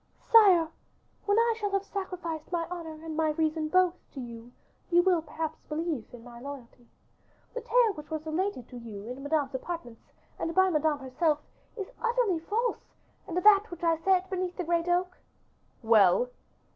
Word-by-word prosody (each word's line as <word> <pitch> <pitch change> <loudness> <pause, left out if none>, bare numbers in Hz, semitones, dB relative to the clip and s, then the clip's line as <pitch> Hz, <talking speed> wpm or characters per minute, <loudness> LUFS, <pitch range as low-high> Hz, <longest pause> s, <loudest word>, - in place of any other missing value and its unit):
"Sire, 385 -8 +7 0.6
when 405 +1 +3
I 465 0 +4
shall 410 -2 -1
have 395 0 +1
sacrificed 360 -6 -5
my 340 -2 0
honor 325 -3 -7
and 320 -1 -5
my 315 0 +2
reason 310 0 0
both 365 +1 +4 0.2
to - - -5
you, 235 -1 -9 0.4
you 350 0 +5
will 360 -3 +3
perhaps 315 0 -5
believe 305 -6 -3
in 240 -2 -12
my 240 -1 -11
loyalty. 250 -3 -10 0.7
The 485 - -4
tale 480 -4 +3
which 300 -3 -10
was 315 -1 -4
related 315 - -2
to 250 - -9
you 215 -4 -8
in 250 +3 -7
Madame's 285 -1 0
apartments, 260 -4 -6 0.3
and 330 - -2
by 375 0 +5
Madame 305 -1 +2
herself, 290 +3 0 0.4
is 400 +1 -5
utterly 470 -7 +1
false; 445 +8 -2 0.3
and 350 -2 -4
that 410 +3 +6
which 345 0 -9
I 330 -1 +4
said 370 +3 +2
beneath 370 -2 -3
the 360 - -2
great 340 0 0
oak 360 +1 0 0.3
" - - -38
"Well!" 220 +1 +5
330 Hz, 175 wpm, -29 LUFS, 285-370 Hz, 0.7 s, Sire